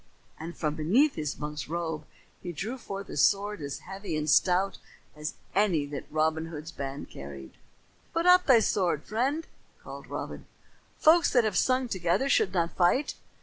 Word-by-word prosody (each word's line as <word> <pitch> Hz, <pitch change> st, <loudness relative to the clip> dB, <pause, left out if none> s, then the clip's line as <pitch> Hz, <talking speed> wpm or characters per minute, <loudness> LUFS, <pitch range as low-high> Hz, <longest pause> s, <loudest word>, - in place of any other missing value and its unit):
and 165 Hz, +2 st, -7 dB
from 150 Hz, -2 st, -1 dB
beneath 205 Hz, -, +3 dB
his 150 Hz, -2 st, -3 dB
monk's 150 Hz, 0 st, -5 dB
robe 160 Hz, -1 st, -3 dB, 0.4 s
he 175 Hz, -, -5 dB
drew 200 Hz, -, -4 dB
forth 200 Hz, -6 st, -7 dB
a -, -, -7 dB
sword 200 Hz, +7 st, +2 dB
as 140 Hz, -1 st, -5 dB
heavy 190 Hz, -3 st, -4 dB
and 150 Hz, 0 st, 0 dB
stout 190 Hz, +4 st, +3 dB, 0.4 s
as 150 Hz, +1 st, -5 dB, 0.2 s
any 185 Hz, -7 st, +2 dB
that 145 Hz, -1 st, -6 dB
Robin 160 Hz, +1 st, +1 dB
Hood's 160 Hz, 0 st, -7 dB
band 140 Hz, -1 st, -6 dB
carried. 70 Hz, -1 st, -9 dB, 0.6 s
"Put 335 Hz, +1 st, -1 dB
up 360 Hz, 0 st, +6 dB
thy 245 Hz, -5 st, +7 dB
sword, 175 Hz, -8 st, +1 dB
friend," 270 Hz, +9 st, -1 dB, 0.4 s
called -, -, -9 dB
Robin. -, -, -6 dB, 0.5 s
"Folks 325 Hz, 0 st, +5 dB
that 245 Hz, -3 st, +5 dB
have 215 Hz, -3 st, -1 dB
sung 255 Hz, +5 st, +2 dB
together 190 Hz, +5 st, 0 dB
should 195 Hz, -, +3 dB
not 170 Hz, -2 st, -1 dB
fight." 185 Hz, +11 st, +2 dB
175 Hz, 165 wpm, -28 LUFS, 155-220 Hz, 0.6 s, thy